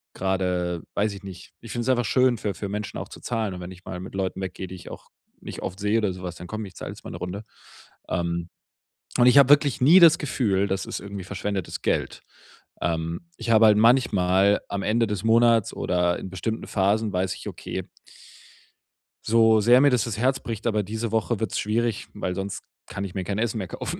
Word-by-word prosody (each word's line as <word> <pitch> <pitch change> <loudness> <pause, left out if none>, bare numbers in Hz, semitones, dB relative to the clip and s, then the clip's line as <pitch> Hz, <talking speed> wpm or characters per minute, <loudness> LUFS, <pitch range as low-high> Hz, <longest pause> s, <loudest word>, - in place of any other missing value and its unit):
grade 90 -3 -1
weiß 105 0 0
ich 100 0 -11
nicht, 90 -2 -10
ich 115 - -10
find's 120 +1 -2
einfach 120 -3 +2
schön 125 0 +3
für 100 -1 -3
für 100 +2 -6
Menschen 105 0 -4
auch - - -7
zu - - -11
zahlen, 110 -5 -2
und 90 - -8
wenn 90 +1 -7
ich 95 +1 -13
mal 90 -1 -6
mit 95 - -9
Leuten 95 0 -3
weggehe, 95 0 -5
die 95 - -8
ich 90 - -11
auch - - -11 0.3
nicht - - -8
oft 95 +1 -5
sehe 105 +2 +1
oder 105 -4 0
so 90 - -10
was, 90 -1 -5
dann: 90 - -10
„Komm 110 +2 -5
ich, 95 - -12
zahle - - -6
jetzt - - -12
mal - - -8
'ne - - -6
Runde.“ 95 +4 -5 0.7
Ähm, 85 -1 -2 0.7
und 120 0 +5
ich 125 - +6
habe 140 -1 +7
wirklich 145 -3 +4
nie 165 +8 +8
das 170 -1 +8
Gefühl, 100 -9 0
das 95 0 -2
ist - - -5
irgendwie 100 -2 -7
verschwendetes 100 -1 -4
Geld. - - -1 0.6
Ähm, 85 - -2
ich - - -5
habe 110 0 +6
halt 105 -1 +5
manchmal 100 -5 +4
am 100 -1 -3
Ende 115 +2 +2
des 105 -1 -3
Monats 115 -1 +4
oder 90 -1 0
in - - -7
bestimmten 110 +5 -4
Phasen 105 +2 +1
weiß 90 0 0
ich: - - -10
„Okay“ - - -6 1.4
„so 110 -1 +5
sehr 120 +4 +6
mir 145 - +6
das 125 -4 +2
das 115 -4 -4
Herz 130 +3 +1
bricht, 115 0 -4
aber 105 -2 +1
diese 110 +3 -4
Woche 110 0 0
wird's 110 -4 -2
schwierig, 115 +1 -1
weil 90 0 -3
sonst 100 +1 -4 0.3
kann 100 0 -5
ich 95 - -8
mir 95 - -2
kein 100 +2 -3
Essen 115 0 -1
mehr 95 -4 -4
kaufen, - - -5
105 Hz, 220 wpm, -25 LUFS, 95-115 Hz, 1.4 s, nie